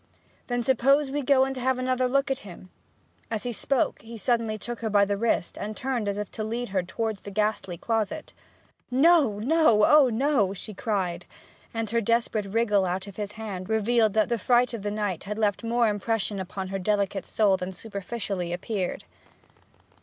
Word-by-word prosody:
'Then 245 -1 -1
suppose 270 +3 +3
we 290 +1 -1
go 265 -1 +4
and 270 0 -4
have 255 0 +1
another 255 0 +1
look 275 +2 +1
at 270 - -1
him?' 185 -1 -12 0.6
As 220 -2 -3
he 245 -1 -3
spoke, 265 +3 0
he 230 +1 -9
suddenly 225 -1 0
took 240 +3 -6
her 225 - -2
by 205 -1 +4
the 200 0 -1
wrist, 220 -4 -1
and 215 +1 -5
turned 255 -5 -2
as 200 0 -1
if 210 -1 -4
to 215 - -4
lead 235 +2 -3
her 190 -1 +1
towards 215 +3 -3
the - - -8
ghastly 210 -3 -1
closet. 225 - -2 0.6
'No 275 -4 +4
no! 240 -2 +4
Oh 295 -3 +6
no!' 230 -5 +1
she 215 +3 -7
cried, 185 -5 -2 0.4
and 225 -1 -2
her 230 0 +2
desperate 230 -2 0
wriggle 205 -1 +2
out 185 +2 -2
of 200 -2 -11
his 210 -1 -4
hand 205 -4 -6
revealed 220 0 +2
that 220 +2 +3
the 235 -1 0
fright 245 +2 +3
of 230 - -4
the 205 - -2
night 205 -4 -3
had 210 +1 -4
left 210 0 0
more 235 0 +2
impression 210 -1 -1
upon 190 0 -5
her 195 0 -3
delicate 200 0 0
soul 205 -3 +3
than 185 0 -4
superficially 200 -2 -4
appeared. 185 +1 -3
220 Hz, 190 wpm, -26 LUFS, 200-240 Hz, 0.6 s, Oh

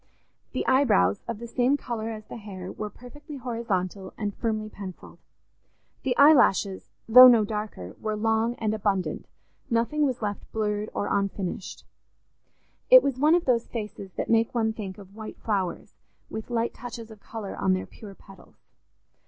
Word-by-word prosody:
The - - -2
eyebrows, 230 - +3
of 235 -2 -3
the 235 - -8
same 245 +4 +1
colour 230 -4 -4
as 215 -1 -7
the - - -9
hair, 190 -4 -8
were 215 - -5
perfectly 290 +6 -11
horizontal 205 -6 -3
and 205 -1 -3
firmly 215 -1 -2
pencilled; 195 -4 -10 0.8
the 250 -2 -1
eyelashes, 245 -10 +5 0.2
though 250 +3 +11
no 230 -4 +6
darker, 210 - -5
were 215 -1 -2
long 225 +2 +1
and 215 -2 -1
abundant—nothing 230 +6 -2
was 255 -2 -3
left 205 -1 -4
blurred 210 -1 -1
or - - -1
unfinished. 195 -2 -3 1.0
It - - +9
was 270 -2 -1
one 305 +4 +5
of 350 - 0
those 240 -3 +2
faces 210 -4 -6
that - - -3
make 225 +1 +2
one 220 -2 +1
think 195 -4 -7
of 200 -1 -14
white 220 -1 -8
flowers 195 -5 -3 0.4
with 220 +2 -6
light 235 -1 -1
touches 230 -2 -8
of 215 - -13
colour 210 -2 -7
on 190 - +1
their 185 - -2
pure 200 -3 -12
petals. 195 0 -17
220 Hz, 160 wpm, -26 LUFS, 200-240 Hz, 1.0 s, though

